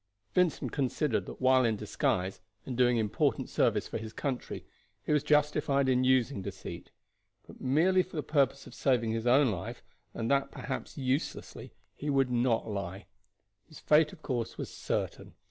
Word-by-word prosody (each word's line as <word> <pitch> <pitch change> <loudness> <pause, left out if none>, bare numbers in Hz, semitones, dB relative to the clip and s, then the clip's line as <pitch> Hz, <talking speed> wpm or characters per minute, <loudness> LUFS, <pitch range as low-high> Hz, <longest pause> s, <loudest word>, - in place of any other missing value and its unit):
Vincent 180 -3 +1
considered 135 -1 0
that - - -8
while 130 0 +5
in 115 -2 +2
disguise, 95 -2 -1 0.2
and 130 - -4
doing 125 -1 +4
important 110 -2 0
service - - +1
for - - -4
his 110 0 -8
country, 135 -4 -4 0.4
he - - -1
was 150 -1 +4
justified 150 -2 +2
in 130 -1 +3
using 130 -3 +2
deceit; - - -7 0.6
but - - -14
merely 165 +8 +3
for 180 -1 -9
the 150 - -1
purpose 140 -2 +1
of - - -12
saving 120 -5 +1
his 115 +1 -2
own 130 0 +5
life, 95 -2 -6 0.3
and 115 +2 -2
that 140 0 +2
perhaps 130 - -6
uselessly, 135 +2 -3 0.2
he 150 - -5
would 135 -3 +2
not 120 -2 +1
lie. 100 -2 -5 0.6
His 155 - -13
fate, 150 0 +4
of - - -15
course, 120 -4 -3
was - - -5
certain. - - -3
130 Hz, 165 wpm, -30 LUFS, 115-145 Hz, 0.6 s, while